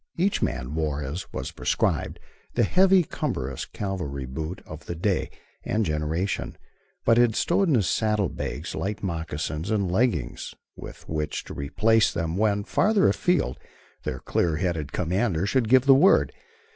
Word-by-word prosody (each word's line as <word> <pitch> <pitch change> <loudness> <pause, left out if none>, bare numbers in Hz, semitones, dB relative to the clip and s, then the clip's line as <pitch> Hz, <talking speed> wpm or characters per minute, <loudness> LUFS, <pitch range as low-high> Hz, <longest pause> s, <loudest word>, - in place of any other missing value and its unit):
Each 190 +4 +1
man 65 +3 -2
wore, 75 -2 -1
as 75 +7 -5
was 65 - -5
prescribed, - - -1 0.4
the - - +3
heavy, 185 - +5
cumbrous 70 - -3
cavalry 90 -10 -4
boot 80 +7 -5
of 80 0 -10
the 85 - -4
day 95 +3 0 0.3
and 110 0 0
generation, 80 +5 -2 0.5
but 115 0 +5
had 120 -2 +4
stowed 190 +3 +2
in 145 - +4
his 105 -6 +2
saddle 105 -3 +1
bags 80 +1 -5
light 105 +2 -3
moccasins 80 -1 -3
and 100 -5 0
leggings 90 - -1 0.2
with - - -11
which 75 -1 -3
to - - -9
replace 110 +11 +2
them 80 -1 -2
when, 105 0 +1
farther 210 - +3
afield, 175 - +1 0.4
their - - -3
clear 85 -3 0
headed 80 -5 -2
commander 90 +1 0
should 115 +1 +1
give 130 +1 +5
the 135 - +8
word. 165 +9 +5
95 Hz, 155 wpm, -25 LUFS, 80-115 Hz, 0.5 s, the